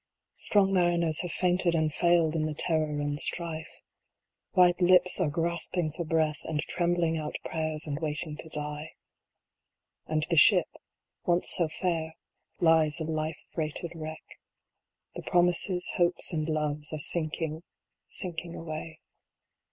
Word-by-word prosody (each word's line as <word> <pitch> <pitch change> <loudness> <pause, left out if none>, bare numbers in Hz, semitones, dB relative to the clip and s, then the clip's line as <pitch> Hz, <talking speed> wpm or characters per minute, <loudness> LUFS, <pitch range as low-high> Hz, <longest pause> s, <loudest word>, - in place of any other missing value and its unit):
Strong 195 -2 +3
mariners 170 -3 +2
have 175 - -3
fainted 180 -1 +2
and 155 -2 +1
failed 170 -2 +3
in 155 -1 0
the 155 - -4
terror 155 -2 +1
and 145 0 -2
strife. 165 -1 -2 0.7
White 180 -1 +4
lips 180 +1 +4
are 175 -5 +2
grasping 170 +1 -1
for 170 +3 -4
breath, 155 -1 0
and 155 -2 -2
trembling 170 -2 0
out 150 - -5
prayers, 155 -1 -2
and 145 -1 -3
waiting 155 0 -1
to 160 - -7
die. 150 0 -5 1.1
And 155 -1 0
the 170 - 0
Ship, - - +6 0.6
once 175 0 +2
so 170 - +2
fair, 160 -1 -2 0.4
lies 160 -2 +4
a - - -2
life 155 0 -3
freighted 160 +1 -3
wreck. 155 -1 -7 0.9
The - - -6
Promises, 180 +1 +1
Hopes, 175 0 +1
and 155 0 -1
Loves, 150 -1 -2
are 155 - -3
sinking, 155 +1 0 0.5
sinking 170 -1 -2
away. 160 0 -7
160 Hz, 135 wpm, -28 LUFS, 155-175 Hz, 1.1 s, Ship